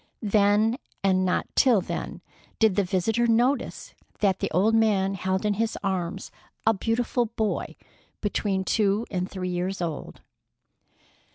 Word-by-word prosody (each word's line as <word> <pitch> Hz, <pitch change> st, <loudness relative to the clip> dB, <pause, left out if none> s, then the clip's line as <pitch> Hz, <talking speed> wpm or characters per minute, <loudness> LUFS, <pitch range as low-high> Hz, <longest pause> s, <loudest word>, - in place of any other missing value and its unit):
Then 210 Hz, +3 st, +3 dB, 0.2 s
and 185 Hz, -1 st, +3 dB
not 185 Hz, -, 0 dB
till 250 Hz, -6 st, +5 dB
then -, -, -5 dB, 0.4 s
did 220 Hz, -4 st, +3 dB
the 205 Hz, -, +3 dB
visitor 205 Hz, +6 st, +1 dB
notice 240 Hz, +5 st, 0 dB, 0.3 s
that 195 Hz, -3 st, +2 dB
the -, -, -1 dB
old 195 Hz, +7 st, +2 dB
man 205 Hz, -4 st, +2 dB
held 190 Hz, +1 st, -1 dB
in 210 Hz, -, +2 dB
his 225 Hz, +2 st, -1 dB
arms 190 Hz, -1 st, -3 dB, 0.3 s
a 225 Hz, -, +5 dB
beautiful 235 Hz, +3 st, 0 dB
boy 220 Hz, -1 st, -2 dB, 0.4 s
between 200 Hz, -2 st, -1 dB
two 210 Hz, +2 st, +1 dB
and 185 Hz, -1 st, -2 dB
three 185 Hz, -1 st, -4 dB
years 180 Hz, +2 st, -2 dB
old. 165 Hz, -4 st, -5 dB
200 Hz, 140 wpm, -26 LUFS, 190-225 Hz, 0.4 s, till